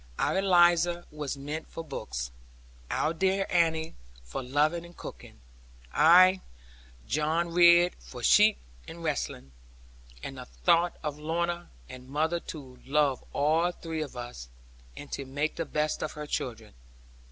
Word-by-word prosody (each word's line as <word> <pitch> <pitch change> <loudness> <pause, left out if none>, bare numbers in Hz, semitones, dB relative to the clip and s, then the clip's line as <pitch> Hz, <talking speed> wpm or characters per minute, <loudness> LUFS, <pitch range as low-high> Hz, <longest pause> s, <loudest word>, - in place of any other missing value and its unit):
Our - - +1
Eliza 175 -2 +4
was 150 -2 -4
meant 150 +3 -6
for 165 - -7
books; 65 - -5 0.6
our 160 - 0
dear 190 +3 +1
Annie 165 -2 +1 0.3
for - - -5
loving 150 +6 +1
and 170 0 -14
cooking; - - -10 0.5
I, 185 +4 +6 0.6
John 160 +4 0
Ridd, 175 0 +6
for 125 -2 -11
sheep, 210 - +6 0.3
and 165 0 -9
wrestling, 105 - -3 0.7
and 135 -1 -6
the 125 - -8
thought 170 +5 +1
of 150 -1 -4
Lorna; 170 +2 -2 0.2
and 130 0 -11
mother 160 +4 0
to 135 -7 -10
love 140 -2 +1
all 160 +5 +2
three 165 -2 -5
of 145 -4 -6
us, 120 - -8 0.5
and 145 - -9
to 140 - -3
make 145 +3 -3
the 165 - -2
best 150 0 -1
of 155 - -3
her 150 0 -6
children. 115 -6 -4
155 Hz, 140 wpm, -28 LUFS, 140-170 Hz, 0.7 s, I